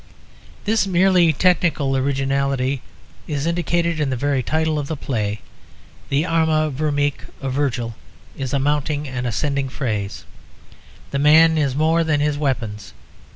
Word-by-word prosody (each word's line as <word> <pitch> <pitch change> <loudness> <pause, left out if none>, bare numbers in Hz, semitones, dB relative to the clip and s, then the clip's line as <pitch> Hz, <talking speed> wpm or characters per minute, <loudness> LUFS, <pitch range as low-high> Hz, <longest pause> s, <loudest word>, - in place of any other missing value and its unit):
This 215 -1 +2
merely 180 -2 +4
technical 155 -4 +2
originality 135 -1 0 0.5
is 145 -2 -2
indicated 170 -1 0
in 150 -2 0
the 130 - -1
very 140 +1 0
title 155 +3 0
of 140 - -4
the 160 - -4
play. 110 -7 -2 0.7
The 140 +3 +1
Arma 160 -2 +2
Virumque 145 0 -1
of 135 -2 -3
Virgil 125 -4 -1 0.4
is 135 -2 -4
a 140 - +1
mounting 145 +1 0
and 125 -1 -3
ascending 140 +3 -1
phrase, 110 -7 -3 0.9
the 140 - -1
man 160 +3 +6
is 140 -4 +1
more 160 +3 +2
than 155 -2 +1
his 145 0 +1
weapons. 115 -8 -3
145 Hz, 140 wpm, -21 LUFS, 135-160 Hz, 0.9 s, man